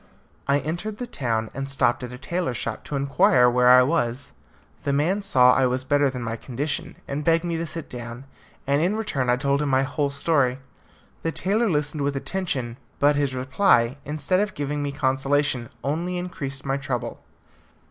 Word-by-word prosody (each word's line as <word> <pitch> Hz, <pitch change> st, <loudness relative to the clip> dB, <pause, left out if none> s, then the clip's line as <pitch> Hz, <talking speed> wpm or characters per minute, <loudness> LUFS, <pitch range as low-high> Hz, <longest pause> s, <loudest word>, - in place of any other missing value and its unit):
I 140 Hz, 0 st, +4 dB
entered 175 Hz, +9 st, -4 dB
the 250 Hz, -, -4 dB
town, 115 Hz, -, -2 dB
and 135 Hz, +1 st, -4 dB
stopped 125 Hz, -3 st, +1 dB
at 125 Hz, -, -6 dB
a 125 Hz, -, -8 dB
tailor's 170 Hz, -4 st, -2 dB
shop 115 Hz, -1 st, -4 dB
to 145 Hz, -, -4 dB
inquire 135 Hz, -2 st, +4 dB
where 125 Hz, 0 st, +3 dB
I 125 Hz, 0 st, +8 dB
was. 130 Hz, -2 st, -1 dB, 0.5 s
The 140 Hz, -, -1 dB
man 165 Hz, +9 st, +1 dB
saw 125 Hz, -10 st, +5 dB
I 130 Hz, 0 st, +3 dB
was 130 Hz, +1 st, -1 dB
better 145 Hz, +1 st, +2 dB
than 125 Hz, -2 st, -5 dB
my 115 Hz, 0 st, -3 dB
condition, 140 Hz, +6 st, -4 dB
and 145 Hz, +2 st, -3 dB
begged 165 Hz, +2 st, +3 dB
me 170 Hz, -1 st, -2 dB
to 165 Hz, 0 st, -3 dB
sit 165 Hz, -1 st, -6 dB
down, 120 Hz, +1 st, -8 dB, 0.4 s
and 140 Hz, +2 st, +2 dB
in 185 Hz, +5 st, +1 dB
return 140 Hz, -, -1 dB
I 125 Hz, -, +5 dB
told 140 Hz, +2 st, 0 dB
him 150 Hz, -, 0 dB
my 135 Hz, 0 st, +3 dB
whole 145 Hz, +1 st, -1 dB
story. 140 Hz, -3 st, +1 dB, 0.6 s
The 165 Hz, -, -1 dB
tailor 205 Hz, +8 st, +1 dB
listened 150 Hz, -2 st, -1 dB
with 140 Hz, 0 st, 0 dB
attention, 135 Hz, -7 st, -2 dB, 0.2 s
but 145 Hz, +1 st, +4 dB
his 140 Hz, -2 st, 0 dB
reply, 130 Hz, -2 st, +2 dB
instead 155 Hz, +5 st, 0 dB
of 210 Hz, -1 st, -1 dB
giving 145 Hz, 0 st, -2 dB
me 145 Hz, -1 st, -2 dB
consolation, 135 Hz, -2 st, 0 dB
only 170 Hz, +6 st, -1 dB
increased 145 Hz, -7 st, -5 dB
my 135 Hz, 0 st, 0 dB
trouble. 135 Hz, -3 st, -4 dB
140 Hz, 190 wpm, -24 LUFS, 125-160 Hz, 0.6 s, I